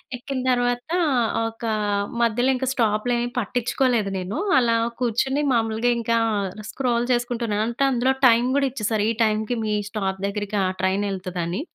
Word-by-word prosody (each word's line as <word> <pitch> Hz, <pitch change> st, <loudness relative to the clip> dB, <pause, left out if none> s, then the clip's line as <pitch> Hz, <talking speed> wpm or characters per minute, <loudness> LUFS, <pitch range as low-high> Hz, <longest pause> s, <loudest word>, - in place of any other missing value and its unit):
ఎక్కిన 260 Hz, +2 st, -5 dB
తర్వాత 245 Hz, +4 st, 0 dB, 0.6 s
ఒక 225 Hz, +1 st, -10 dB, 0.6 s
మధ్యలో 240 Hz, +3 st, +2 dB
ఇంకా 260 Hz, 0 st, -2 dB
స్టాప్లేమి 235 Hz, +2 st, +1 dB
పట్టించుకోలేదు 240 Hz, -1 st, 0 dB
నేను. 185 Hz, +6 st, -4 dB, 0.2 s
అలా 230 Hz, -2 st, +2 dB, 0.2 s
కూర్చొని 255 Hz, +4 st, 0 dB
మామూలుగా 225 Hz, +1 st, +1 dB
ఇంకా 230 Hz, 0 st, +1 dB, 0.5 s
స్క్రోల్ 240 Hz, -1 st, 0 dB
చేసుకుంటున్నాను. 235 Hz, -3 st, 0 dB
అంటే 235 Hz, +4 st, -1 dB
అందులో 255 Hz, +2 st, +2 dB
టైం 235 Hz, 0 st, +5 dB
కూడా 280 Hz, -1 st, +2 dB
ఇచ్చేసారు. 215 Hz, -3 st, -1 dB
ఈ -, -, -1 dB
టైంకి 220 Hz, +2 st, 0 dB
మీ 210 Hz, -, 0 dB, 0.2 s
స్టాప్ 195 Hz, -3 st, -3 dB
దగ్గరికి, 205 Hz, 0 st, -3 dB
ఆ -, -, +1 dB
ట్రైన్ 190 Hz, +2 st, +1 dB
వెళ్తదని. 185 Hz, +2 st, -3 dB
230 Hz, 140 wpm, -23 LUFS, 210-245 Hz, 0.6 s, టైం